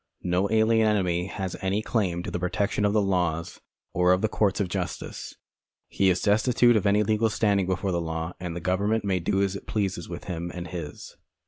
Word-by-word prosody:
No 90 +3 +1
alien 110 0 +3
enemy 90 -4 +1
has 95 -2 -4
any 100 +3 0
claim 90 -8 -1
to - - -5
the - - -2
protection 100 +3 0
of 100 - +2
the 105 -1 +3
laws 90 -3 -1 0.3
or 90 +1 +4
of 90 - 0
the - - +4
courts 105 -2 0
of 100 - +1
justice. 85 - -5 0.5
He 95 - +2
is 90 -1 +1
destitute 120 +3 +4
of 105 -1 +2
any 105 +1 +4
legal 110 +1 +2
standing 100 -4 +1
before 95 +1 -1
the 85 -1 0
law, 80 +1 -4
and 90 -2 -5
the 85 - -5
government 100 +5 0
may 95 -2 +1
do 95 +3 +1
as 100 0 -1
it - - -8
pleases 95 -5 -2
with 85 - -6
him 85 -2 -4
and 85 -1 -6
his. 80 -4 -7
95 Hz, 210 wpm, -26 LUFS, 90-105 Hz, 0.5 s, or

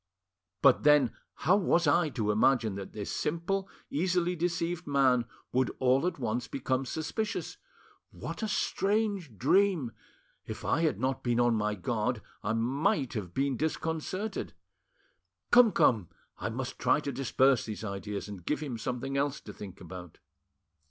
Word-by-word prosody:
But 135 -2 +6
then, 150 -5 +5 0.3
how 185 +6 +6
was 175 -3 +2
I 155 +2 +3
to 110 -6 -1
imagine 110 0 +3
that 95 0 -7
this 105 -2 -5
simple, 185 +5 -1 0.2
easily 180 +2 +1
deceived 170 0 -2
man 130 -4 +3 0.3
would 130 0 +2
all 130 +5 +3
at 180 - -2
once 120 -1 -2
become 130 -1 -1
suspicious? 210 - -3 0.5
What - - -7
a 220 - 0
strange 200 - 0
dream! 170 - +3 0.5
If - - -7
I - - +2
had 155 -11 +1
not 130 +2 -1
been 120 -1 +1
on 120 -1 +4
my 105 -1 0
guard, 110 +4 -1 0.2
I 105 - -1
might 135 - +1
have 95 -7 -5
been 135 -1 +1
disconcerted. 160 - -3 1.0
Come, 240 -2 +7
come, 105 - +3 0.3
I - - -2
must - - -5
try - - +3
to 140 - -3
disperse 135 -1 +2
these 110 0 -5
ideas 100 0 -4
and 100 -4 -8
give 150 - -1
him 130 -7 -4
something 125 +4 -3
else 140 0 0
to 105 - -10
think 100 -2 -9
about." 90 -1 -10
135 Hz, 150 wpm, -30 LUFS, 115-170 Hz, 1.0 s, Come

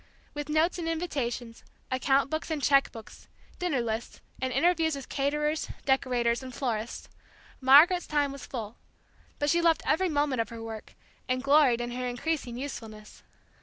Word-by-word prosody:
With 295 0 -5
notes 315 +4 +2
and 330 -1 -2
invitations, 255 -8 -3 0.3
account 270 +1 +2
books 315 +1 -3
and 315 -2 -1
cheque 275 0 +3
books, 225 -2 -12 0.3
dinner 335 -8 0
lists, 225 0 -4 0.2
and 260 0 -1
interviews 325 0 +2
with 275 - -8
caterers, 300 +2 -1 0.2
decorators, 250 -3 +1
and 260 -1 -8
florists, 235 -3 -3 0.5
Margaret's 305 +7 +6
time 290 -2 +1
was 275 - -9
full, 225 -3 -6 0.6
but 290 0 +1
she 340 - +3
loved 330 -1 +3
every 360 +4 +2
moment 290 -5 +1
of 225 - -4
her 230 -1 -8
work, 220 -1 -8 0.3
and 255 +1 0
gloried 275 -4 +4
in 240 0 -4
her 250 +1 -3
increasing 245 -1 -3
usefulness. 220 -6 -8
275 Hz, 160 wpm, -28 LUFS, 240-305 Hz, 0.6 s, Margaret's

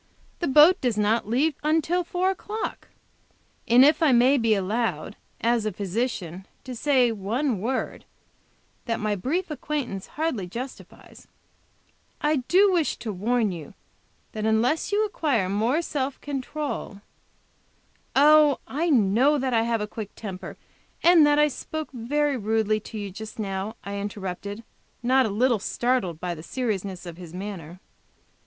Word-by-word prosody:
"The 345 - -1
boat 305 +7 +6
does 245 -4 0
not 215 +1 +1
leave 285 +7 +2
until 320 +4 +1
four 360 +2 0
o'clock. 420 +3 -5 0.8
And 245 +3 +7
if 300 +2 +4
I 315 -4 +5
may 255 +3 +5
be 225 -2 +3
allowed, 200 -2 -2 0.3
as 235 -1 +2
a 215 - -1
physician, 195 -2 -3 0.2
to 255 - -7
say 255 -1 +3
one 225 +3 -1
word, 255 +4 -3 0.8
that 230 -1 -1
my 215 -1 0
brief 310 - -2
acquaintance 285 -9 -4
hardly 295 - -1
justifies, 245 +8 -9 0.9
I 300 0 +1
do 370 +10 +4
wish 340 -5 +1
to 220 -3 -5
warn 220 +2 0
you 165 -5 -8 0.6
that 215 - -5
unless 225 - +1
you 420 +1 +2
acquire 285 - 0
more 225 - +1
self 275 -3 -3
control 280 -6 -5 0.6
" - - -40 0.4
"Oh, 300 +1 +6
I 330 +5 -1
know 250 +3 +4
that 260 -2 -1
I 225 - +4
have 230 -1 0
a - - -1
quick 210 -1 -8
temper, 190 -4 -7 0.5
and 335 -3 +7
that 295 0 +3
I 300 0 +5
spoke 310 +2 -6
very 280 +4 0
rudely 215 -1 +1
to 215 - -9
you 205 -2 -5
just 220 +3 -9
now," 200 0 -3
I 200 0 -5
interrupted, 200 +1 -5 0.4
not 260 0 +4
a - - -3
little 235 +3 +2
startled 230 -6 -1
by 180 0 -3
the 160 - -9
seriousness 195 -4 -3
of 170 -1 -8
his 175 -1 -10
manner. 180 -3 -7
235 Hz, 150 wpm, -25 LUFS, 205-290 Hz, 0.9 s, And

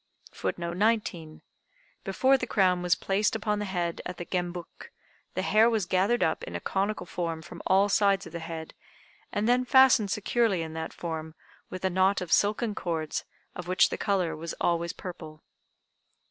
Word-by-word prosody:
] - - -22
[Footnote 170 0 -3
19: 200 -7 0 0.6
Before 265 +1 +3
the 255 -2 -2
crown 185 -5 +2
was 180 0 +3
placed 205 +3 0
upon 210 -1 -1
the 210 - -2
head 175 -3 -2
at 180 -1 -6
the 175 - -6
Gembuk, 175 -1 -5 0.4
the - - -1
hair 220 +2 +5
was 220 -5 0
gathered 195 +7 +2
up 160 - 0
in 85 - -7
a - - -2
conical 200 - -2
form 165 -2 -4
from - - -10
all 195 +2 +4
sides 200 -1 +2
of 165 - -11
the 170 - -4
head, 160 -1 -7 0.6
and 210 +2 -1
then 250 +1 +3
fastened 255 -5 +5
securely 210 -3 +1
in 160 -1 -7
that 160 0 -4
form 160 -2 -6 0.3
with 185 0 -5
a 190 - +1
knot 190 +2 +3
of 180 -3 -6
silken 210 +2 +2
cords 160 -5 -3 0.3
of 180 -1 -7
which 185 +1 +4
the - - -3
color 185 -5 0
was 160 +1 -6
always 170 0 0
purple. 160 -4 -9
185 Hz, 180 wpm, -28 LUFS, 170-210 Hz, 0.6 s, hair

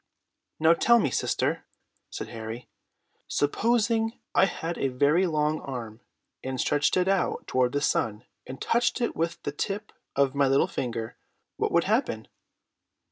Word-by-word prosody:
"Now 160 +1 +6
tell 235 +7 +5
me, 150 - +1
sister," - - 0 0.5
said - - -6
Harry. 115 +1 -7 0.6
"Supposing 225 +7 +1 0.2
I - - +5
had 170 -2 -4
a 135 - +1
very 145 +8 +3
long 155 -1 0
arm, 115 -5 -6 0.4
and 130 0 -4
stretched 145 +6 +2
it 180 0 +2
out 195 -1 0
toward 125 -1 +1
the 145 - 0
sun, 115 -4 0 0.2
and 130 - -7
touched 240 +2 +1
it 240 - -1
with 165 +1 -1
the - - -2
tip 200 +8 -4 0.2
of 140 -1 +2
my 140 -1 +3
little 135 +1 +4
finger. 115 -3 -4 0.4
What - - 0
would - - +4
happen?" - - 0
145 Hz, 150 wpm, -27 LUFS, 130-190 Hz, 0.6 s, Now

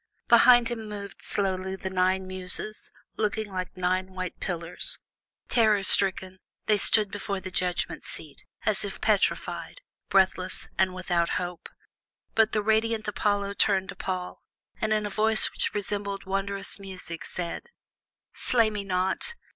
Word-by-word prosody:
Behind 240 0 +7
him 225 -3 -5
moved 200 -1 -8
slowly 190 -1 -1
the 190 0 -5
nine 185 0 +1
Muses, 185 +3 +5 0.3
looking 215 0 -1
like 185 -1 -5
nine 185 +1 -1
white 185 -1 -5
pillars. 170 -1 -4 0.5
Terror 215 -4 +3
stricken, 190 -1 +3 0.3
they 210 -1 +2
stood 210 0 +3
before 200 -1 -3
the 185 0 -8
judgment 180 -1 -2
seat, - - -6 0.2
as - - +2
if - - -6
petrified, - - -1 0.3
breathless, 185 -1 +1
and 185 -1 +1
without 175 -2 0
hope; 180 -2 -6 0.6
but 220 -1 +3
the 210 -1 0
radiant 220 0 +1
Apollo 205 -1 0
turned 190 -2 +2
to - - -6
Paul, 185 -1 -5 0.4
and, 215 - 0
in 215 -1 +1
a 205 - -4
voice 220 +2 +3
which - - -2
resembled 200 -1 -3
wondrous 195 +1 -1
music, 185 -4 -7
said: 175 - -5 0.7
"Slay 230 -3 +2
me 205 -1 -4
not! 190 - -1
195 Hz, 140 wpm, -27 LUFS, 185-215 Hz, 0.7 s, Behind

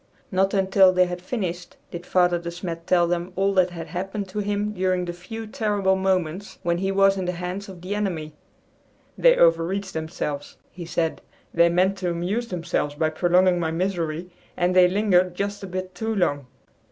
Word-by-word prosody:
Not 195 +1 +2
until 190 -1 +5
they 185 0 +4
had 180 0 -5
finished 180 -4 -4
did 175 +1 -7
Father 180 -1 +3
De 170 0 -5
Smet 170 -1 -6
tell 175 -2 +4
them 175 +1 -2
all 195 +1 +1
that 185 -1 +3
had 170 -2 -7
happened 190 +4 -4
to 210 - -4
him 205 +1 -1
during 185 -2 0
the 175 - -4
few 225 +6 -8
terrible 205 -3 0
moments 190 0 -1
when 170 0 0
he 195 +1 0
was 195 0 +4
in 190 - -2
the 180 - -1
hands 180 +3 -5
of 180 -3 -10
the 190 +3 -3
enemy. 175 -7 -3 0.8
"They - - +5
overreached 170 +4 +2
themselves," 155 -2 -4
he 175 -1 -8
said. 165 -1 -1 0.3
"They 170 0 +5
meant 185 +3 +2
to 180 -1 -1
amuse 185 +8 -2
themselves 170 -6 -2
by 155 +1 0
prolonging 180 +2 +3
my 165 -2 0
misery, 170 -1 -2 0.3
and 180 0 +1
they 180 -1 +7
lingered 185 -2 +2
just 200 +2 -3
a 195 - -6
bit 185 0 -5
too 220 +4 -3
long." 145 -8 0
180 Hz, 190 wpm, -24 LUFS, 170-195 Hz, 0.8 s, they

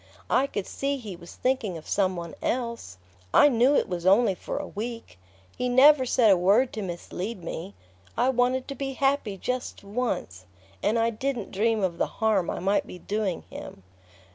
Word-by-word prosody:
I 270 +2 +3
could 205 -7 -4
see 280 0 -2
he 215 -8 -7
was 170 0 -13
thinking 250 -9 -1
of 160 - -12
some 190 -2 +1
one 170 -1 -6
else. 235 - -3 0.4
I 290 - +8
knew 250 +3 +4
it - - +2
was 180 -2 -4
only 195 +3 +5
for - - -5
a - - -3
week...He 95 - -7
never 260 +1 +6
said 230 -3 +4
a 190 - +5
word 205 +9 +3
to 215 - -4
mislead 185 +2 -5
me...I 160 - -4
wanted 255 0 +1
to - - -3
be 270 0 -4
happy 270 -7 0
just 250 +3 -4
once 200 - -3 0.3
and 215 +3 +1
I 230 0 +2
didn't 245 -1 -3
dream 220 +1 +1
of 175 -3 -1
the - - +2
harm 215 -5 +2
I - - -2
might 195 +3 +1
be - - -9
doing 200 -1 -2
him!" 95 - -9
215 Hz, 180 wpm, -26 LUFS, 180-250 Hz, 0.4 s, I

